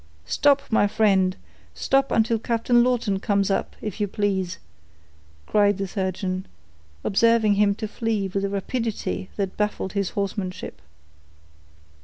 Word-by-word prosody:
"Stop, 280 - +3
my 215 -2 +4
friend—stop 205 +6 0
until 225 0 +2
Captain 235 +1 +2
Lawton 235 -6 +1
comes 200 0 +1
up, - - -1
if 210 0 -4
you 205 - +2
please," 190 -3 -1 0.9
cried 205 -2 +3
the 195 -1 -2
surgeon, 185 -1 -3 0.6
observing 225 0 +3
him 200 0 +3
to 215 0 -4
flee 220 -2 -1
with 195 +1 -2
a 200 - 0
rapidity 205 -1 -3
that 195 -2 -3
baffled 210 -2 -1
his 200 -2 0
horsemanship. 195 -2 -4
205 Hz, 125 wpm, -24 LUFS, 195-225 Hz, 0.9 s, my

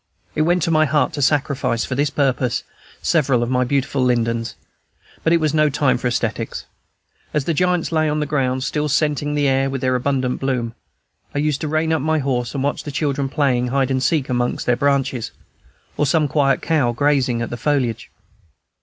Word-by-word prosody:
It - - 0
went 175 +1 +2
to 165 - +1
my 155 -1 +4
heart 150 +1 +1
to 145 - -3
sacrifice, 140 -4 +1
for - - -4
this 145 +3 +1
purpose, 130 -4 0 0.4
several 135 -7 +2
of 120 - -3
my 125 0 +2
beautiful 135 +1 0
lindens; 115 -2 0 0.7
but 165 - +2
it 170 - +4
was 155 -1 0
no 155 -1 +3
time 140 -1 +1
for - - -1
aesthetics. 115 -2 -2 0.7
As 145 -3 +1
the 165 - 0
giants 180 +1 +1
lay 155 -1 +2
on 150 +1 0
the 150 - 0
ground, 130 -3 0
still 150 +2 -1
scenting 150 0 0
the 145 -1 +2
air 135 0 +2
with 135 -1 -4
their 130 -1 +1
abundant 130 0 0
bloom, 125 -4 -2 0.6
I - - -1
used 150 -1 0
to 155 - -2
rein 155 +1 0
up 160 - 0
my 160 +2 +1
horse 130 -3 -1
and 135 - -1
watch 145 - -1
the - - -6
children 140 -1 -1
playing 130 -4 +1
hide 135 +1 0
and 130 -1 0
seek 145 +1 +1
amongst 125 -1 -1
their 125 - +3
branches, 135 -3 0 0.7
or 150 - +2
some 155 -1 +2
quiet 140 -1 +1
cow 145 -7 +1
grazing 130 -3 +1
at - - -5
the - - -3
foliage. 125 -6 -1
140 Hz, 200 wpm, -20 LUFS, 125-150 Hz, 0.7 s, my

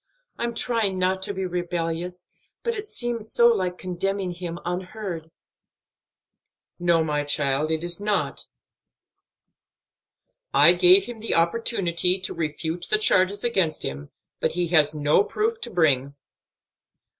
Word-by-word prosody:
"I'm 235 -1 -2
trying 225 -6 0
not 185 +1 0
to 190 - -1
be 190 0 -2
rebellious, 175 0 -3 0.4
but 470 - 0
it 425 -1 -6
seems 235 - -3
so 235 0 +5
like 185 -5 0
condemning 190 +1 -2
him 175 -1 -6
unheard." 180 -2 -5 1.5
"No, 170 -2 +3
my 150 -2 -1
child, 145 0 0
it 160 0 -1
is 175 +3 -2
not. 205 0 -1 2.1
I - - +8
gave 370 +2 +6
him 240 -2 -8
the 225 - -1
opportunity 180 -1 +1
to 185 - -4
refute 160 +2 -4
the 215 - +3
charges 200 -1 +2
against 190 -10 +1
him, 70 +2 -5 0.3
but - - 0
he 175 -1 -1
has 155 -3 +3
no 150 +5 +3
proof 445 - -2
to 240 - -4
bring." 140 - +1
180 Hz, 135 wpm, -24 LUFS, 165-210 Hz, 2.1 s, I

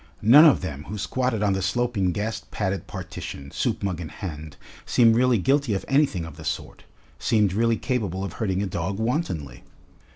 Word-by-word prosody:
None 135 +9 +9
of 150 - +5
them 75 -5 -6
who 105 - -6
squatted 125 +1 -1
on 100 -2 +2
the 95 - -1
sloping 100 -1 0
gas 110 +2 -3
padded 100 -2 -3
partition, 70 0 -7
soup - - -2
mug 90 -4 -2
in 80 - -6
hand, 80 -6 -7 0.3
seemed 115 -2 +4
really 125 0 +3
guilty 135 +2 +1
of 95 - -4
anything 135 - +2
of 80 -2 -10
the 80 - -10
sort, 75 - -5 0.3
seemed 105 -4 +2
really 115 +2 +2
capable 100 -8 -2
of 100 - -5
hurting 100 -3 -1
a - - -1
dog 95 +1 -3
wantonly. 110 - -2
100 Hz, 185 wpm, -24 LUFS, 90-120 Hz, 0.3 s, None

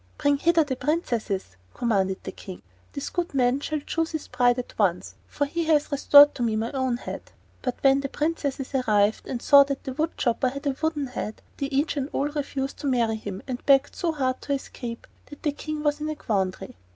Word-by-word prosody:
"Bring 285 0 +2
hither 330 +2 +3
the 280 -3 -3
princesses," 235 - -2 0.2
commanded 195 -5 0
the - - -5
King. 185 -2 -10 0.3
"This 280 - -5
good 350 -4 -2
man 250 0 +3
shall 305 +1 -3
choose 325 +2 -2
his 315 - -4
bride 245 -1 +3
at 250 - -5
once, 180 -4 +1
for 285 - -1
he 335 +4 -2
has 305 -2 +2
restored 285 +1 +7
to - - -7
me 225 -2 +1
my 225 +2 -2
own 260 -3 0
head." - - -8 0.3
But 250 -2 -2
when 270 0 +5
the 275 - -4
princesses 285 -4 -2
arrived 215 -5 +2
and 245 -2 -4
saw 280 -1 +8
that 275 -1 -4
the 265 - -5
wood 315 +4 -2
chopper 250 +1 +1
had 280 +3 -8
a 275 -2 0
wooden 315 -3 0
head, 235 -4 -6
they 275 - -2
each 285 +2 0
and 275 0 -2
all 285 +2 0
refused 280 -2 -3
to 285 - -4
marry 235 -4 +2
him, 200 -3 -6
and 250 -2 -5
begged 275 0 +4
so 345 -2 0
hard 260 -4 -1
to 285 - -2
escape 240 -3 -6 0.2
that 290 - -13
the 295 - +1
King 305 +1 -5
was 295 0 0
in 305 - -2
a 310 - -3
quandary. 190 - -2
275 Hz, 215 wpm, -25 LUFS, 240-295 Hz, 0.3 s, saw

